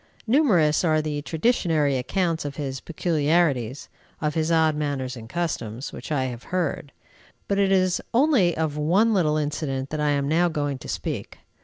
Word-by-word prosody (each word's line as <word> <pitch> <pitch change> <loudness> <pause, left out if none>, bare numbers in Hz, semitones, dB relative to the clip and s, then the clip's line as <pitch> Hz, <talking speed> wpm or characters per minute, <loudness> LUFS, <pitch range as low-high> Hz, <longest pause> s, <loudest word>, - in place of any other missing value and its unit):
Numerous 210 - +3
are 155 -2 +3
the 150 -1 -2
traditionary 160 - +1
accounts 160 +6 -1
of 145 -1 -5
his 135 -2 -4
peculiarities, 150 -6 0 0.3
of 150 -1 -1
his 160 +1 0
odd 160 -2 +3
manners 140 -4 -2
and 115 -2 -10
customs, 130 -8 -3
which - - -8
I 140 -3 +1
have 125 -2 -5
heard; 170 -5 -2 0.6
but 200 0 0
it 195 -1 +3
is 185 -1 +2
only 240 - +3
of 155 -2 -1
one 190 +10 +3
little 155 -6 +2
incident 145 -3 -2
that 155 -1 -2
I 150 - +2
am 140 -1 +1
now 170 +4 +3
going 145 -4 -2
to - - -10
speak. - - -4
155 Hz, 170 wpm, -24 LUFS, 140-175 Hz, 0.6 s, Numerous